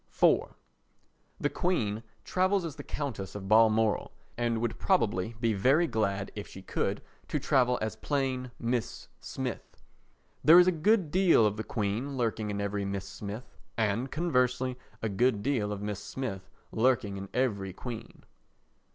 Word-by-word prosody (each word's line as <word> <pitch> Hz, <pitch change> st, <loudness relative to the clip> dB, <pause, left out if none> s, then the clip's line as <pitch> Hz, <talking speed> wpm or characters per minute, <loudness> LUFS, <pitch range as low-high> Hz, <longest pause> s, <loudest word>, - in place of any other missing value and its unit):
iv -, -, +4 dB, 0.8 s
The -, -, +1 dB
Queen 115 Hz, -, 0 dB, 0.2 s
travels 185 Hz, 0 st, +1 dB
as 155 Hz, -5 st, -5 dB
the -, -, -7 dB
Countess 120 Hz, -11 st, -5 dB
of 95 Hz, -1 st, -6 dB
Balmoral 110 Hz, 0 st, +4 dB, 0.2 s
and 115 Hz, -1 st, 0 dB
would 115 Hz, -1 st, -2 dB
probably 115 Hz, -, +1 dB
be 115 Hz, -1 st, +2 dB
very 135 Hz, -, +4 dB
glad, 100 Hz, -7 st, -1 dB
if 105 Hz, -, -6 dB
she 95 Hz, -, -11 dB
could, -, -, -2 dB, 0.2 s
to -, -, -1 dB
travel 125 Hz, -2 st, +3 dB
as 110 Hz, 0 st, -2 dB
plain 130 Hz, -1 st, -1 dB
Mrs. 120 Hz, -1 st, -2 dB
Smith. -, -, -6 dB, 0.6 s
There 160 Hz, +3 st, +9 dB
is 180 Hz, -, +8 dB
a 185 Hz, -, +4 dB
good 180 Hz, 0 st, +2 dB
deal 180 Hz, -, +5 dB
of 105 Hz, -1 st, +1 dB
the 110 Hz, -, -4 dB
Queen 115 Hz, +7 st, -2 dB
lurking 110 Hz, -3 st, -1 dB
in 100 Hz, 0 st, -2 dB
every 100 Hz, 0 st, -1 dB
Mrs. 100 Hz, 0 st, -2 dB
Smith 105 Hz, +4 st, -8 dB, 0.2 s
and, 115 Hz, +4 st, 0 dB
conversely, 125 Hz, -6 st, +1 dB, 0.3 s
a -, -, +1 dB
good 110 Hz, +1 st, +1 dB
deal 120 Hz, -7 st, 0 dB
of 100 Hz, -1 st, -4 dB
Mrs. 105 Hz, -1 st, -3 dB
Smith 100 Hz, -3 st, -5 dB, 0.2 s
lurking 110 Hz, -4 st, +1 dB
in 95 Hz, 0 st, -7 dB
every 105 Hz, -7 st, 0 dB
queen. 115 Hz, +4 st, -8 dB
115 Hz, 155 wpm, -30 LUFS, 105-130 Hz, 0.8 s, There